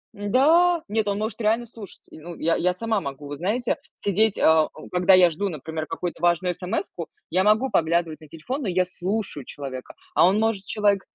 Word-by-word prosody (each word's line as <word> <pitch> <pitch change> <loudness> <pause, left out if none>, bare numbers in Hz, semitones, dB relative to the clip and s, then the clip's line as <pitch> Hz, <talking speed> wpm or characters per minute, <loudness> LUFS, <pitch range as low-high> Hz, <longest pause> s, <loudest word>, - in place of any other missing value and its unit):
Н-да. 310 - +3
Нет, 215 0 0
он 200 0 0
может 220 +2 -4
реально 225 +3 +1
слушать. 220 -4 -12
И - - -12
ну, 170 +2 -9
я, 165 +1 0
я 180 +1 0
сама 220 0 -1
могу, 140 0 -7
вот 145 0 -7
знаете, 225 +7 -1 0.2
сидеть, 205 +1 +2
а 160 -1 +5
а - - -21 0.2
когда 180 +1 +5
я 180 -1 +6
жду, 200 +5 -2
например, 155 0 -5
какую-то 175 -2 -5
важную 175 +1 +2
смску, 180 -2 -4 0.2
я 185 +2 +2
могу 215 +6 +3
поглядывать 165 -1 0
на 155 - -13
телефон, 165 - -5
но 215 - -3
я 185 0 +1
слушаю 190 -4 -4
человека. 130 -2 -8 0.2
А - - +6
он 195 +3 +2
может 220 -3 0
человек 205 -1 +1
185 Hz, 200 wpm, -24 LUFS, 165-215 Hz, 0.2 s, я